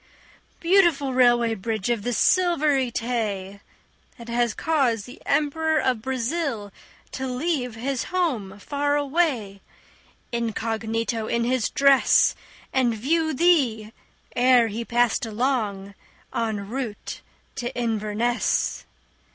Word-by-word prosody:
Beautiful 335 -7 +3
Railway 240 -2 +4
Bridge 220 +1 -2
of 235 -3 0
the 245 - -2
Silvery 300 - +2
Tay! 210 -5 -3 0.6
That 235 -1 -11
has 235 -1 0
caused 260 -10 +1
the 250 - -13
Emperor 315 +1 +1
of 250 -6 0
Brazil 260 -3 -2 0.4
to 265 0 -4
leave 250 -2 -2
His 255 +3 -2
home 255 - -2
far 285 +6 -1
away, 275 - 0 0.7
incognito 225 -1 -2
in 235 0 0
his 245 -2 0
dress, 275 -1 +4 0.4
And 250 -3 +2
view 315 +8 0
thee 255 -10 +2 0.4
ere 245 -2 +4
he 225 +3 -4
passed 240 0 +1
along 215 -4 -2 0.4
en 215 -3 -2
route 235 -2 -5 0.4
to 240 0 -3
Inverness. 225 0 -1
240 Hz, 110 wpm, -24 LUFS, 220-275 Hz, 0.7 s, Railway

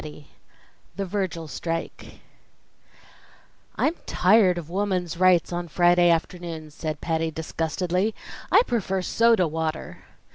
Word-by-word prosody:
III 150 -1 -10 0.7
The 195 - -3
Virgil 185 -4 -3
Strike 165 +2 -5 1.5
"I'm 310 - +1
tired 185 -2 +4
of 170 -3 -6
Woman's 180 -2 -2
Rights 180 -1 +3
on 175 0 -3
Friday 175 +1 +4
afternoons," 165 -2 -2
said 155 -1 -5
Patty 160 -1 -1
disgustedly. 170 +5 -2 0.4
"I - - +6
prefer 195 -5 -1
soda 230 -3 +3
water!" 160 0 -4
175 Hz, 110 wpm, -24 LUFS, 160-185 Hz, 1.5 s, I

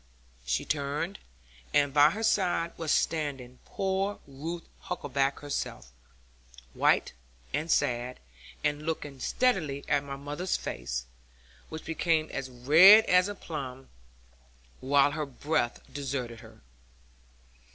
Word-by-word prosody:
She 65 -1 0
turned, 150 +6 -2 0.6
and 145 -1 +3
by 145 +1 +7
her 220 +6 -4
side 180 -6 +1
was 160 -2 -2
standing 135 -6 -1
poor 195 +1 -1
Ruth 160 +5 -6 0.2
Huckaback 140 -1 -1
herself, 65 - -4 0.8
white, - - +2 0.4
and 155 +4 -1
sad, 125 -4 0 0.4
and 150 0 0
looking 150 -4 -4
steadily 155 - 0
at 145 - +2
my 140 -1 -6
mother's 145 +6 -3
face, - - -4 0.6
which 160 0 -7
became 160 -1 0
as 135 -1 -4
red 160 - +8
as 180 +1 +4
a 205 - -5
plum 135 -7 -7 0.9
while 140 +2 +3
her 150 0 -3
breath 140 -2 -1
deserted 130 -4 -4
her. - - -15
145 Hz, 115 wpm, -29 LUFS, 135-165 Hz, 0.9 s, red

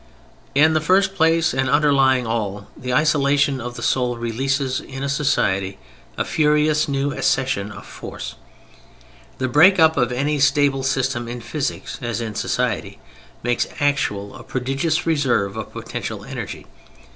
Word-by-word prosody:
In 155 +3 +5
the 155 - +2
first 190 +3 +3
place 165 -2 +2
and 130 0 0
underlying 135 -4 +3
all, 105 -3 -3
the 125 0 -5
isolation 140 -1 +2
of 120 0 -6
the 120 - -7
soul 125 -2 +1
releases 130 +3 -1
in 135 -2 -7
a - - -1
society 100 -10 0 0.4
a - - 0
furious 150 0 +2
new 140 0 -1
accession 120 -6 0
of 100 - -10
force. - - -8 1.0
The 130 - -1
break 160 +10 +6
up 160 -2 +5
of 125 -2 +2
any 145 +4 0
stable 140 -1 +3
system 130 -2 -1
in 120 +1 -5
physics, 140 +4 -4
as 120 -3 -2
in 115 -2 -4
society, - - -2 0.5
makes 120 0 0
actual 105 -9 0
a - - -10
prodigious 135 +5 -1
reserve 130 -11 +1
of 110 -1 -6
potential - - -6
energy. - - -6
135 Hz, 145 wpm, -21 LUFS, 120-150 Hz, 1.0 s, break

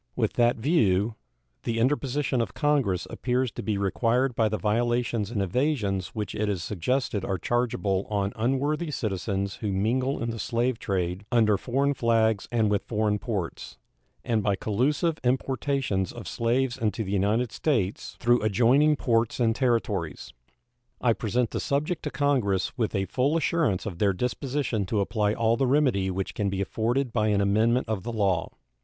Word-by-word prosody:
With - - 0
that 120 +1 +3
view, 110 - +2 0.5
the 115 -1 -2
interposition 135 +1 +1
of 115 - -4
Congress 140 - +1
appears 125 -1 -1
to - - -6
be 105 -2 -1
required 115 +6 +1
by 110 -2 +2
the 110 - -1
violations 120 0 0
and 105 -4 -1
evasions 100 - 0
which 105 -1 -3
it 105 0 -1
is 95 -5 -2
suggested 105 - -1
are 95 -1 -1
chargeable 100 -3 -1
on 100 -1 -1
unworthy 140 +8 0
citizens 100 -5 -2
who 105 -3 -3
mingle 125 +8 0
in 115 0 -2
the 115 - -6
slave 120 +1 0
trade 90 -3 -2
under 110 -4 +4
foreign 135 +6 0
flags 110 -4 +1
and 110 -3 +2
with 100 -1 +2
foreign 105 -2 0
ports, 100 -8 -4 0.5
and 115 -3 +1
by 100 -1 +1
collusive 145 - 0
importations 130 - 0
of - - -9
slaves 120 +2 0
into 110 -1 -1
the 95 - -5
United 105 +5 +1
States 110 - -1
through 120 -1 +3
adjoining 125 +9 +4
ports 115 -3 0
and 115 -2 +2
territories. 110 - -1 0.7
I 120 -2 +3
present 115 +2 -1
the - - -2
subject 150 +4 -1
to - - 0
Congress 125 -11 0
with 115 -4 -1
a 95 0 0
full 135 - +1
assurance 160 - +1
of 90 -5 -5
their 100 -2 +3
disposition 125 -1 -2
to 110 - 0
apply 105 +1 0
all 115 0 +2
the 135 - +1
remedy 125 -9 +2
which 95 +1 -3
can 100 -1 -1
be 95 0 -3
afforded 115 +6 -1
by 110 -2 +1
an 105 -2 +2
amendment 110 +5 +2
of 110 -3 -2
the 120 - -5
law. 100 -6 0
115 Hz, 170 wpm, -26 LUFS, 100-125 Hz, 0.7 s, under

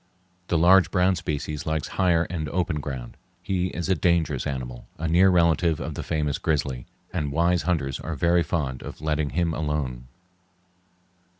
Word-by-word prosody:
The 85 - +1
large 90 +3 +6
brown 95 0 +3
species 75 -2 -4
likes 80 -1 -1
higher 90 -3 +2
and 80 -3 -4
opener 85 -2 -1
ground. 65 -4 -6 0.3
He 90 -1 0
is 85 -1 -4
a 95 - +3
dangerous 85 -7 +1
animal, 60 -3 -5
a 80 - -2
near 90 +4 +5
relative 85 -2 +3
of - - -4
the - - -5
famous 75 -3 -1
grizzly, 70 -6 -1 0.3
and 75 -5 -1
wise 85 +3 +2
hunters 70 -7 -1
are 80 - -4
very 85 +4 +3
fond 75 -6 -2
of - - -8
letting 75 -1 -1
him 85 +1 0
alone. 75 -6 -3
80 Hz, 165 wpm, -25 LUFS, 75-85 Hz, 0.3 s, large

